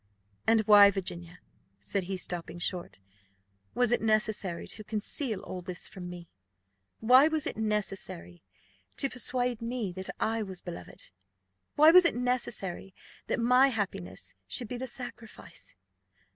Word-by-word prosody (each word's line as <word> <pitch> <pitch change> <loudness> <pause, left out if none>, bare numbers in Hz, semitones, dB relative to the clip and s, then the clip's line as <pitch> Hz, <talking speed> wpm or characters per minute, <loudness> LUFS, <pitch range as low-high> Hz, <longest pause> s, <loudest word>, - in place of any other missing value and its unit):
"And 225 -1 +5
why, 205 -1 +8
Virginia," 180 -3 -5 0.4
said 175 - -3
he, 190 +1 -4
stopping 175 -2 -4
short, 175 - -3 0.8
"was 245 -1 +2
it 240 - +2
necessary 215 -5 +1
to 215 - -7
conceal 215 +2 -3
all 185 - -7
this 180 -1 -6
from 180 -2 -9
me? 175 -1 -10 0.7
Why 255 +6 +6
was 315 -2 -1
it - - -4
necessary 195 - 0 0.6
to 275 - -1
persuade 250 -1 0
me 230 -4 -3
that 190 +1 -4
I 225 +1 0
was 190 -3 -5
beloved? 175 - -10 0.6
Why 305 +2 +7
was 365 +1 +8
it 335 - +2
necessary 235 -7 -2 0.3
that - - -1
my 250 +3 +5
happiness 200 -7 -4
should 245 - -3
be 245 - -5
the 260 +1 -5
sacrifice?" 240 -2 -9
215 Hz, 140 wpm, -29 LUFS, 185-245 Hz, 0.8 s, why